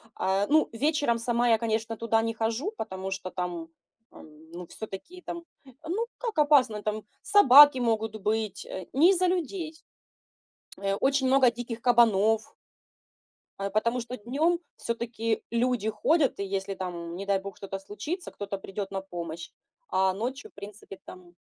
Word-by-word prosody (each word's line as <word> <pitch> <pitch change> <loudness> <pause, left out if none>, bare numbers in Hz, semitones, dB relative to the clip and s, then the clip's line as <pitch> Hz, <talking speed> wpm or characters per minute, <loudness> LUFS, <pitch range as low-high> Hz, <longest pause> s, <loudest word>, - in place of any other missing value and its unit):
а, 195 +1 +1
ну, 310 +1 +3
вечером 290 -1 +1
сама 235 +1 +1
я, 225 - +5
конечно, 225 0 -2
туда 225 0 +1
не 225 0 -1
хожу, 225 - -2
потому 190 -3 -5
что 185 -1 -5
там, 175 -2 -4 0.4
эм, 155 +1 -16
ну, 175 0 -8
всё-таки 220 - -9
там, 340 -1 -6 0.2
э, - - -15 0.2
ну, 410 +8 -1
как 465 -6 -4
опасно, 265 -8 +4
там 215 0 -2 0.2
собаки 290 -8 +8
могут 225 -2 0
быть, 215 0 -1
э. 185 -2 -7
Не 320 +8 +6
из-за 370 -1 +2
людей. 345 -2 -2 1.0
Э, 195 0 -1
очень 270 +4 +1
много 260 -2 +5
диких 235 0 -6
кабанов. 225 -3 +3 1.1
Э, 200 0 -2
потому 230 +4 0
что 245 +2 -6
днем 300 +10 0 0.2
всё-таки 230 -1 -2
люди 235 -2 +1
ходят, 275 +6 +1
и - - -1
если 195 0 -3
там, 175 -3 -6
не 195 +2 -6
дай 200 -1 +1
бог, 195 0 -9
что-то 195 -1 -6
случится, 210 - -6
кто-то 200 -1 -5
придет 195 +1 -6
на 195 -1 -3
помощь. 170 -3 -7 0.4
А 190 0 +2
ночью, 255 - -4
в - - -67
принципе, 200 -1 -10
там 180 -1 -13
225 Hz, 160 wpm, -27 LUFS, 195-260 Hz, 1.1 s, собаки